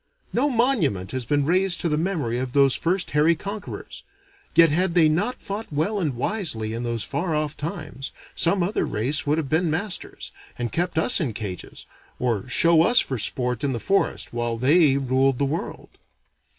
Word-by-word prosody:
No 280 +5 +2
monument 225 - +1
has 130 -2 -3
been 145 +3 +1
raised 185 +2 +2
to - - 0
the 150 - 0
memory 155 -8 -1
of 125 -1 -4
those 140 -2 +4
first 180 +2 0
hairy 150 +3 +3
conquerors; 200 +5 -7 0.5
yet 165 -2 +6
had 175 +2 0
they 165 -3 +5
not 200 +12 -1
fought 205 0 -6
well 160 +9 -1
and 150 -8 -1
wisely 120 - -2
in 115 - -4
those 120 -3 -2
far 165 - -2
off 150 -1 -2
times, 150 -3 -6 0.2
some 175 +2 +3
other 195 +5 -1
race 140 +8 -1
would 150 +2 +2
have 160 -3 -2
been 160 +4 +1
masters, 180 +5 -3 0.3
and 120 -1 -3
kept 175 0 -2
us 190 +6 +3
in 130 -8 -2
cages, 100 -4 -7 0.3
or 120 -1 -2
show 165 +5 +5
us 240 +9 +6
for 130 -3 0
sport 125 +2 -1
in 140 -2 0
the 120 - -3
forest 195 - 0
while 120 -1 -2
they 140 +3 +4
ruled 135 0 +1
the 140 - 0
world. 150 +5 -5
155 Hz, 185 wpm, -23 LUFS, 125-180 Hz, 0.5 s, yet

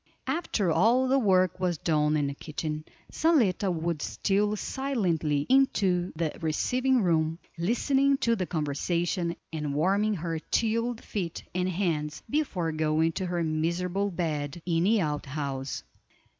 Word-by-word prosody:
After 220 - 0
all 230 +11 +4
the 270 +1 +3
work 185 -5 +3
was 180 -3 0
done 150 -1 +1
in 145 - +1
the 140 - -2
kitchen, 155 +1 -5 0.3
Zaletta 230 - +2
would 165 -2 -2
steal 205 +1 0
silently 180 - -1
into 195 -9 +3
the 160 -1 -2
receiving 250 +10 +1
room, 165 -2 +1 0.2
listening 270 - +2
to 230 -3 +2
the 185 -5 -2
conversation, 170 +3 -1 0.2
and 150 -3 -2
warming 200 +7 +2
her 165 -2 -3
chilled 230 +5 -1
feet 175 -5 -4
and 180 +1 0
hands 165 -5 -2
before 205 - -1
going 155 +1 +1
to 185 +3 -3
her 175 -1 -1
miserable 170 +5 0
bed 160 -3 -3
in 170 -1 +1
the 215 +1 +4
out 150 -3 -2
house. 135 -1 -4
175 Hz, 140 wpm, -28 LUFS, 155-210 Hz, 0.3 s, all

